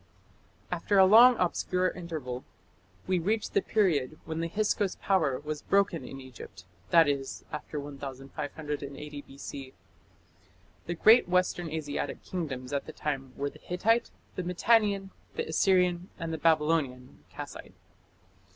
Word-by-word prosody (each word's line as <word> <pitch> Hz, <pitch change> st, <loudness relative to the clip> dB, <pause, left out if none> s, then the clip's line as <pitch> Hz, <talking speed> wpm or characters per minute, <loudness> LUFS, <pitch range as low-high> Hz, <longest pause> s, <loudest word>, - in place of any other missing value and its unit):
After 200 Hz, -, +1 dB
a 190 Hz, -, +8 dB
long 235 Hz, +5 st, +8 dB
obscure 180 Hz, +1 st, +1 dB
interval 155 Hz, -8 st, -6 dB, 0.6 s
we 185 Hz, -1 st, +1 dB
reach 215 Hz, +6 st, -1 dB
the 200 Hz, -, +2 dB
period 155 Hz, -11 st, +1 dB
when 160 Hz, 0 st, -4 dB
the 165 Hz, -, -1 dB
Hyksos 205 Hz, +1 st, 0 dB
power 155 Hz, -10 st, +1 dB
was 150 Hz, 0 st, -5 dB
broken 200 Hz, -4 st, +1 dB
in 135 Hz, -, -8 dB
Egypt, 125 Hz, -7 st, -11 dB, 0.2 s
that 165 Hz, -2 st, +6 dB
is, 140 Hz, -2 st, -2 dB
after 150 Hz, 0 st, -5 dB
1580 145 Hz, +1 st, -6 dB
B.C. 135 Hz, -1 st, -9 dB, 1.1 s
The 175 Hz, -, -2 dB
great 220 Hz, +3 st, +6 dB
Western 180 Hz, -2 st, +1 dB
Asiatic 155 Hz, -2 st, -4 dB
kingdoms 145 Hz, -7 st, -4 dB
at 140 Hz, -, -2 dB
the -, -, -7 dB
time 135 Hz, -3 st, -4 dB
were 140 Hz, 0 st, -2 dB
the -, -, -16 dB
Hittite, 225 Hz, +7 st, +1 dB, 0.3 s
the -, -, -2 dB
Mitannian, 200 Hz, +1 st, +2 dB, 0.2 s
the 465 Hz, 0 st, -2 dB
Assyrian, 180 Hz, -, +2 dB
and 165 Hz, -2 st, -4 dB
the 160 Hz, -, -3 dB
Babylonian 150 Hz, -5 st, +1 dB
(Kassite). -, -, -9 dB
160 Hz, 135 wpm, -29 LUFS, 140-185 Hz, 1.1 s, a